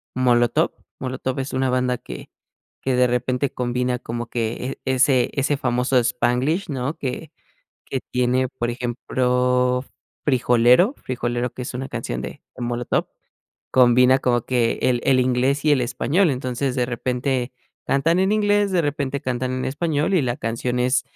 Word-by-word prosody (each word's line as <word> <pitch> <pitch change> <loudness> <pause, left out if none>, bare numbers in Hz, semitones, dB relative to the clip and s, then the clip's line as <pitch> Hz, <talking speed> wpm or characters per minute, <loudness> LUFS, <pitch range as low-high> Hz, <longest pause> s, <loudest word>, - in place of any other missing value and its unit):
Molotov. 120 -2 +2 0.3
Molotov 130 0 -3
es 135 +1 -4
una 130 0 +1
banda 125 0 +1
que - - -9 0.5
que 130 -1 0
de 125 0 +4
repente 125 +2 0
combina 125 0 -1
como 120 +1 -5
que 120 +3 -3
e 130 - 0
ese 130 -1 +3
ese 140 +1 +1
famoso 125 0 +1
spanglish, 125 - 0
¿no?, 140 +2 -3
que 145 +2 -5 0.5
que 135 - -3
tiene, 125 +1 +1
por 120 -1 -3
ejemplo, 125 +1 0 0.4
Frijolero, 125 - +4
Frijolero 120 -1 -3
que 125 - -7
es 125 - -6
una 130 +2 -4
canción 60 +1 -4
de - - -8
de - - -7
Molotov, 120 0 -1 0.6
combina 125 +1 +5
como 120 -2 +1
que 120 -3 +1
el 125 -1 +2
el 130 -1 +4
inglés 130 +3 +1
y 150 - +4
el 140 - +3
español. 160 +8 +1
Entonces, 130 0 -2
de 125 -1 +1
repente, 125 +1 -2 0.3
cantan 165 +6 +2
en 190 +1 +2
inglés, 205 -1 +2
de 185 -2 +2
repente, 140 -2 -2
cantan 130 -2 -2
en 130 - -2
español, 155 +4 0
y 175 - +3
la 120 -2 -1
canción 120 +2 -2
es 125 +1 +2
125 Hz, 160 wpm, -22 LUFS, 125-135 Hz, 0.6 s, combina